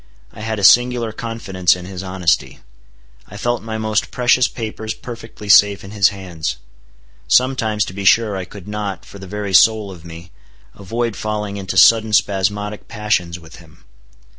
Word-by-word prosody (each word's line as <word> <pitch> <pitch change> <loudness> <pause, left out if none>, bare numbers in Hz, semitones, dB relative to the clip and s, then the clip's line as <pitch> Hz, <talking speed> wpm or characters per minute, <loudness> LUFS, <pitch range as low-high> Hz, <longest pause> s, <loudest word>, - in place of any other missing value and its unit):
I - - -12
had 110 0 -3
a 100 - -4
singular 120 +1 +4
confidence 105 -6 -1
in 90 0 -9
his 95 -1 -7
honesty. 95 -3 -1 0.7
I 105 - -11
felt 120 +2 -1
my 110 0 -5
most 110 -1 -1
precious 125 0 +2
papers 110 -1 -6
perfectly 115 -3 -10
safe 100 +1 +5
in 95 - -10
his 100 -3 +3
hands. 90 -5 -5 0.7
Sometimes 115 -3 +2
to - - -8
be 100 +1 -6
sure 105 +1 +3
I 95 -1 -4
could 100 +1 -12
not, 105 -2 -5
for 100 - -13
the 95 - -10
very 100 0 -5
soul 110 +1 +4
of 85 -4 -12
me, 85 0 -11 0.4
avoid 115 +3 -3
falling 105 -1 -4
into 95 -2 -4
sudden 110 -1 +5
spasmodic 105 +1 0
passions 105 -6 -2
with 80 -2 -14
him. 85 +1 -19
105 Hz, 165 wpm, -18 LUFS, 95-110 Hz, 0.7 s, safe